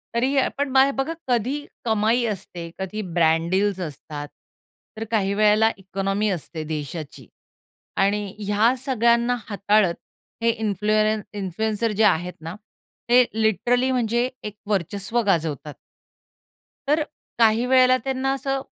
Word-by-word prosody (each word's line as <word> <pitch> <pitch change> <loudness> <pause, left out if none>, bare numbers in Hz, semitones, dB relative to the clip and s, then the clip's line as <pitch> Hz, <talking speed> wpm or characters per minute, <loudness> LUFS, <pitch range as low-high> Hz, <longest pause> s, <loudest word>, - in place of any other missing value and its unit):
तरी 260 +4 +1
आपण 275 +1 0
बाय 270 +1 +5
बघा 270 +5 -1
कधी 255 +4 0 0.2
कमाई 225 +2 +2
असते 180 -5 -5
कधी 190 +3 -4 0.2
ब्रँड 165 0 +3
डील्स 195 0 +1
असतात 150 -2 -6 0.7
तर 220 - -3
काही 200 -3 +1
वेळेला 215 +2 +4
इकॉनॉमी 195 +2 -2
असते 165 -3 -4
देशाची 155 0 -6 0.8
आणि 205 +1 +1
ह्या 210 +4 +2
सगळ्यांना 235 -1 +2
हाताळत 205 -3 +2 0.5
हे 230 - +4
इन्फ्लू 215 -2 -1 0.4
इन्फ्लुएन्सर 215 +4 -1
जे 210 +1 +1
आहेत 180 -3 +2
ना, 165 +3 -6 0.5
ते 250 +1 +7
लिटरली 240 +4 +1
म्हणजे 240 0 +1
एक 210 -1 -6
वर्चस्व 200 +3 -1
गाजवतात. 155 -5 -1 1.1
तर 300 +2 +3 0.4
काही 225 +1 +4
वेळेला 255 0 +5
त्यांना 265 0 -1
असं, 270 0 -2
215 Hz, 120 wpm, -23 LUFS, 190-240 Hz, 1.1 s, ते